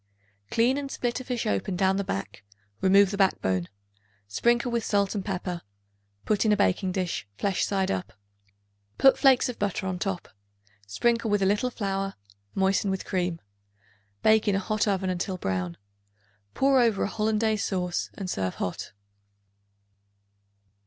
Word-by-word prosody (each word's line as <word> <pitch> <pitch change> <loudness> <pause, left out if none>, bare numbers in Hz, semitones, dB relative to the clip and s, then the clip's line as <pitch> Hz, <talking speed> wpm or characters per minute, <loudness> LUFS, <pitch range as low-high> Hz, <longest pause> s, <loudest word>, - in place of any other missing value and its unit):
Clean 245 +4 +2
and 280 -1 -5
split 245 -2 -2
a - - -6
fish 250 -2 -3
open 100 - -1
down 190 +1 +2
the 200 - 0
back; 100 - -5 0.4
remove 195 +1 +5
the 200 - -4
backbone; 95 - +1 0.6
sprinkle 235 - +1
with 235 -1 0
salt 200 -2 +1
and 205 -3 -3
pepper; 180 -3 -3 0.6
put 210 -2 +2
in 220 - +3
a 210 - +4
baking 190 -1 +1
dish, 180 - -2
flesh 195 -2 0
side 195 -2 0
up. 95 -1 -3 0.8
Put 270 - +6
flakes 265 -3 +5
of 250 - -6
butter 200 -1 -1
on 185 -1 -2
top; 195 -2 -3 0.6
sprinkle 230 - +1
with 205 -1 +2
a - - +3
little 210 +6 +2
flour; 195 -4 -3 0.4
moisten 195 +1 +2
with 190 -1 -2
cream. 175 -3 -2 0.8
Bake 220 0 +4
in 205 - +3
a - - +2
hot 215 +2 0
oven 190 -2 0
until 185 +1 -3
brown. 90 - -2 0.8
Pour 270 -1 +4
over 230 -4 +2
a - - +1
Hollandaise 215 0 0
sauce 180 -2 -2
and 195 - -5
serve 95 - -2
hot. 90 - -4
195 Hz, 155 wpm, -27 LUFS, 180-220 Hz, 0.8 s, Put